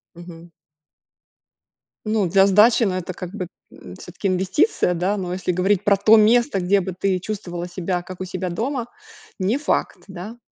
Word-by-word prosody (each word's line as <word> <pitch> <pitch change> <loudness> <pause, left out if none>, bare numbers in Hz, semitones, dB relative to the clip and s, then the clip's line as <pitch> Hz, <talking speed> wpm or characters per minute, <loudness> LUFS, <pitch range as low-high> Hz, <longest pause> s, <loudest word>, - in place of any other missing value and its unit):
Мгм. 170 0 -12 1.6
Ну, 215 -3 +1
для 195 +2 +5
сдачи, 215 +5 +5
ну, 195 -4 +1
это 185 0 -4
как 180 0 -8
бы, 185 -4 -5 0.2
м, 90 - -12
всё-таки 180 - -6
инвестиция, 185 - +1
да, 185 +4 -1
но 180 -2 -4
если 185 0 -2
говорить 185 +2 +1
про 200 -1 +3
то 215 +3 +6
место, 225 +1 +4
где 195 +3 +2
бы 190 0 -5
ты 190 -1 0
чувствовала 175 -3 -5
себя 180 0 -3
как 185 +1 -10
у - - -3
себя 185 0 -4
дома, 240 +6 -3 0.5
не 195 +7 +1
факт, 295 - -2
да? 195 +5 -9
190 Hz, 170 wpm, -21 LUFS, 180-210 Hz, 1.6 s, то